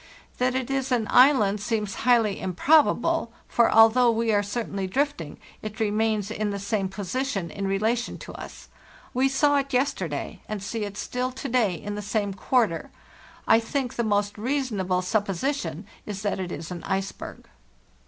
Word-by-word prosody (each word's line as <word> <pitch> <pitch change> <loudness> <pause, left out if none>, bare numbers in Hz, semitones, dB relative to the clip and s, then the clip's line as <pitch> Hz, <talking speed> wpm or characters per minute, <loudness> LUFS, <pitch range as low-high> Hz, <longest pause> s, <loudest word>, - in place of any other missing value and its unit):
That 250 0 +1
it 260 0 -2
is 270 -1 -1
an 235 -3 +2
island 245 -7 +5
seems 210 -2 -1 0.2
highly 225 -5 +4
improbable; 300 - +3 0.2
for 235 - +3
al 225 0 +8
though 245 +1 +3
we 230 -1 +1
are 205 - +3
certainly 205 -2 -3
drifting, 195 - -2 0.2
it 215 0 -7
remains 215 -1 0
in 215 -1 -2
the 200 - -3
same 200 -1 -1
position 195 - -3
in 195 -1 -3
relation 220 +5 0
to - - -10
us. - - -10 0.5
We 260 +2 +2
saw 285 +1 +3
it 275 0 -2
yesterday, 190 - -1
and 210 -2 -4
see 215 +1 -3
it 205 0 -8
still 250 +3 -2
to 260 - -5
day 230 -7 +2
in 205 +6 -6
the 210 - -4
same 205 -1 -1
quarter. 195 -3 0 0.6
I 225 - +6
think 250 +2 -2
the 235 - -1
most 205 -1 0
reasonable 210 -8 -1
supposition 195 - -1 0.2
is 205 -1 -5
that 205 -2 -1
it 180 -2 -4
is 160 +4 -6
an 175 -2 -6
iceberg. 190 0 -4
215 Hz, 170 wpm, -25 LUFS, 195-250 Hz, 0.6 s, al